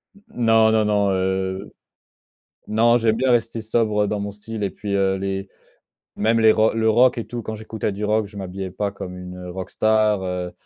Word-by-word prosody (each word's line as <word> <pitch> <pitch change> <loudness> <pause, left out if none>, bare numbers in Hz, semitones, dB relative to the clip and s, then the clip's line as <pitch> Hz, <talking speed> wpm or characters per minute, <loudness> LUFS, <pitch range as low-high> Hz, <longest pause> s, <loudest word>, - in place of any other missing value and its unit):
N 200 - -20 0.2
non, 110 -1 +5
non, 110 -1 +3
non, 100 -2 +2
heu, 95 +1 -2 0.9
non. 115 +2 +3
J'aime 110 -1 +2
bien 130 +1 +1
rester 115 -1 +1
sobre 110 -2 +1
dans 105 0 -2
mon 100 0 -4
style 105 +1 -7
et 100 - 0
puis 100 -1 -5
heu, 95 -1 +2
les 95 0 -3 0.7
même 115 +2 +2
les 110 -1 +6
rocks 110 +1 +3
le 110 0 +2
rock 120 +3 +4
et 115 - -4
tout 120 -1 -5
quand 110 - -5
j'écoutais 110 -1 -4
du 100 +2 -4
rock, 105 0 +1
je 100 0 -13
m'habillais 95 0 -5
pas 100 +2 -2
comme 90 -2 -8
une 90 0 -8
heu, 90 0 -8
rock 95 +1 -6
star 110 -2 +2
heu, 90 -1 -3
105 Hz, 210 wpm, -22 LUFS, 95-110 Hz, 0.9 s, les